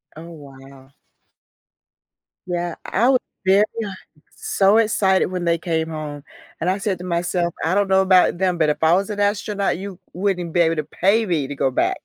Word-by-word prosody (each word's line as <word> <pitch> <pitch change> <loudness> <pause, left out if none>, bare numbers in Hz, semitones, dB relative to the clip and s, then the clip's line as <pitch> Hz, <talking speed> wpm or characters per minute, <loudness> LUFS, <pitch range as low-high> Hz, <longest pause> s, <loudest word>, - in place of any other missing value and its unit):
Oh, 160 - -10
wow. 135 -3 -14 1.6
Yeah, 175 -1 -3
I 235 +7 +1
was 260 -1 +4 0.3
very 195 +2 +5 0.7
so 200 +2 +2
excited 205 -4 +2
when 180 -1 -4
they 170 0 +2
came 165 -1 -2
home, 150 -2 -6 0.4
and 175 - 0
I 190 - +1
said 200 -3 -2
to - - -8
myself, 175 0 -1
"I 165 - +1
don't 200 0 +2
know 190 0 +4
about 185 -2 +4
them, 180 -1 0
but 155 -2 +3
if 150 - -2
I 160 +1 +5
was 195 +3 +1
an 205 -1 -4
astronaut, 205 0 0
you 195 -2 -8
wouldn't 180 -3 -2
be 175 - +1
able 165 -1 +3
to 155 - -2
pay 200 +9 +1
me 160 -8 -1
to 145 - -6
go 135 -1 0
back." - - 0
180 Hz, 190 wpm, -21 LUFS, 160-195 Hz, 1.6 s, very